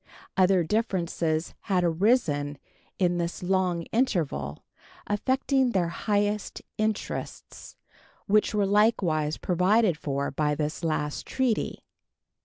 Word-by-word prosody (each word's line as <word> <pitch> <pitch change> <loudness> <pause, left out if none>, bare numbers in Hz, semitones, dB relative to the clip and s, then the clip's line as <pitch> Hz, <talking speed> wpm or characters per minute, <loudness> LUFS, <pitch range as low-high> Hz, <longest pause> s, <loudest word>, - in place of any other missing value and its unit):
Other 185 -1 +4
differences 170 -5 -1
had 185 -3 +1
arisen 165 - +1 0.4
in 175 -2 +1
this 170 +1 -3
long 180 -2 +1
interval, 155 - -1 0.4
affecting 260 +4 +1
their 175 -3 +1
highest 205 +2 -1 0.2
interests, 215 -1 -4 0.5
which 210 +1 +3
were 205 -1 +2
likewise 190 -7 +2
provided 185 0 +2
for 140 -2 -2
by 150 +1 0
this 150 +2 -3
last 150 -2 -2
treaty. 255 -4 -1
180 Hz, 100 wpm, -27 LUFS, 155-210 Hz, 0.5 s, Other